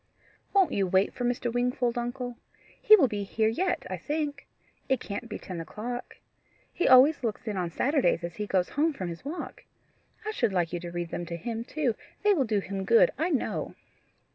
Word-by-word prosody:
"Won't 390 -4 +4
you 195 -2 +1
wait 190 +2 +2
for 245 - -3
Mr. 240 -1 -1
Wingfold, 245 0 0
uncle? 245 0 -3 0.5
He 430 - +9
will 315 -11 +4
be 210 -3 -3
here 220 +2 +1
yet, 355 +10 -1
I - - -4
think. 295 -1 -3 0.4
It 265 -2 +2
can't 210 +3 -6
be - - -4
ten 180 -3 -6
o'clock. 235 +9 -6 0.6
He 355 - +1
always 265 +3 +7
looks 225 0 -3
in 210 - -2
on 180 -2 -1
Saturdays 250 - +1
as 170 -1 -5
he 210 0 -3
goes 185 -3 +1
home 310 +3 +1
from 185 -9 -4
his 170 0 -8
walk. 305 +6 -6 0.6
I 430 - -1
should 235 - 0
like 175 -2 0
you 175 - -1
to 175 0 -6
read 175 -1 -4
them 175 - -4
to 170 0 -4
him 225 +6 -4
too. 265 -1 -1 0.3
They 420 0 +5
will 285 -8 +2
do 210 -3 +1
him 195 0 -4
good, - - +5
I 330 +3 +1
know." 290 -7 -2
240 Hz, 205 wpm, -28 LUFS, 190-285 Hz, 0.6 s, He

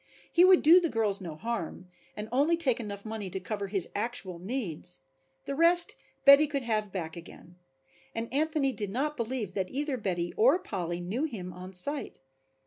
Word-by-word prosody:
He 345 - +6
would 370 0 +6
do 335 +4 +8
the 340 -2 -1
girls 210 -5 0
no 165 -4 -7
harm 190 -1 -5 0.3
and 210 +1 -5
only 290 +7 +2
take 265 -7 +2
enough 205 -2 -7
money 215 -3 -5
to 190 - -4
cover 200 +1 -4
his 190 -3 +1
actual 205 -5 -3
needs. 180 - -3 0.4
The - - -3
rest 340 +4 +5 0.3
Betty 280 +2 +8
could 280 -2 -3
have 215 -3 -2
back 165 -4 -5
again. 170 +1 -13 0.6
Anthony 275 +5 0
did 205 -4 -4
not 285 +8 -2
believe 235 -5 -3
that 190 -1 -2
either 280 0 -2
Betty 175 -5 -3
or 260 +9 +4
Polly 175 - -4
knew 215 - -2
him 190 - -6
on 185 +1 -9
sight. 280 +11 +1
220 Hz, 175 wpm, -29 LUFS, 185-280 Hz, 0.6 s, do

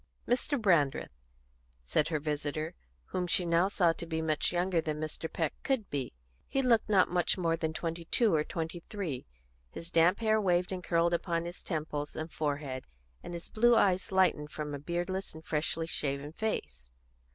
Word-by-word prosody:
"Mr. 255 +3 +1
Brandreth," 140 - +1 0.6
said 65 - +1
her 155 -2 0
visitor, 150 +1 -2 0.4
whom 180 -1 0
she 175 +1 +4
now 170 +2 +3
saw 180 -4 +3
to 170 - -7
be 160 -1 -2
much 155 -1 +1
younger 175 -1 +1
than 155 -1 -3
Mr. 155 +1 -4
Peck 160 -3 -1
could 260 -6 -1
be. 135 -3 -2 0.4
He 270 - 0
looked 230 -4 +3
not 190 -4 +4
much 180 +1 +2
more 165 -3 +1
than 160 -1 -2
twenty 165 +1 -4
two 225 +2 +3
or 150 -1 +3
twenty 165 +2 -4
three; 170 - -4 0.4
his 170 - -7
damp 170 +3 +4
hair 220 -1 +3
waved 180 -2 +2
and 185 -1 -4
curled 170 0 +2
upon 170 -1 0
his 175 +1 -7
temples 150 -3 -3
and 155 +1 -4
forehead, 145 -3 -2 0.4
and 175 - -7
his 170 - -7
blue 240 +2 +4
eyes 190 -3 +3
lightened 180 -6 +3
from 150 -1 -5
a 145 - -4
beardless 175 +4 -3
and 160 - -11
freshly 160 +1 0
shaven 140 -2 -2
face. 65 - -3
165 Hz, 180 wpm, -31 LUFS, 150-185 Hz, 0.6 s, she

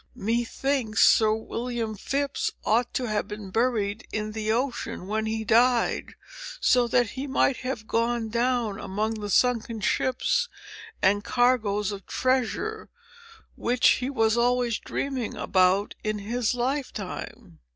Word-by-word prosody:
Me 230 +4 0
thinks 240 -3 +1
Sir 220 -1 +5
William 230 0 -3
Phips 280 +6 -1 0.2
ought 235 +3 +2
to 255 - 0
have 215 -2 -1
been 210 -2 -8
buried 220 -2 0
in 215 0 -3
the 215 0 -2
ocean, 235 -4 -2
when 215 +2 -1
he 220 0 -2
died; 235 +2 +2 0.4
so 245 -1 +3
that 240 -2 +2
he 270 +2 -5
might 265 -1 +2
have 255 -4 -4
gone 230 0 0
down 235 -2 0
among 210 +3 -2
the 205 - -4
sunken 230 0 +2
ships, 480 - +1 0.5
and 205 +2 +3
cargoes 215 -5 +1
of 195 -2 -8
treasure, 260 - -1 0.7
which 240 +1 +2
he 250 - -1
was 225 -5 +2
always 240 -1 +1
dreaming 265 -5 -3
about 185 +2 +2
in 215 0 -1
his 230 +4 -1
lifetime." 245 -6 -4
230 Hz, 135 wpm, -26 LUFS, 215-250 Hz, 0.7 s, Sir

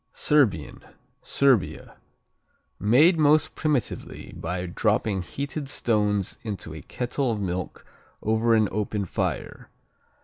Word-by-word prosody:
Serbian 120 - +1 0.4
Serbia 135 -7 +1 0.8
Made 145 - +5
most 150 0 +4
primitively 145 -7 -3
by 90 +2 -3
dropping 105 +2 0
heated 140 - -5
stones 105 -6 0
into 100 -7 -6
a 80 - -8
kettle 125 - -2
of 110 - -2
milk 90 -2 -4 0.4
over 110 +1 +3
an 110 -2 +3
open 105 -1 -2
fire. - - -3
110 Hz, 105 wpm, -25 LUFS, 95-140 Hz, 0.8 s, Made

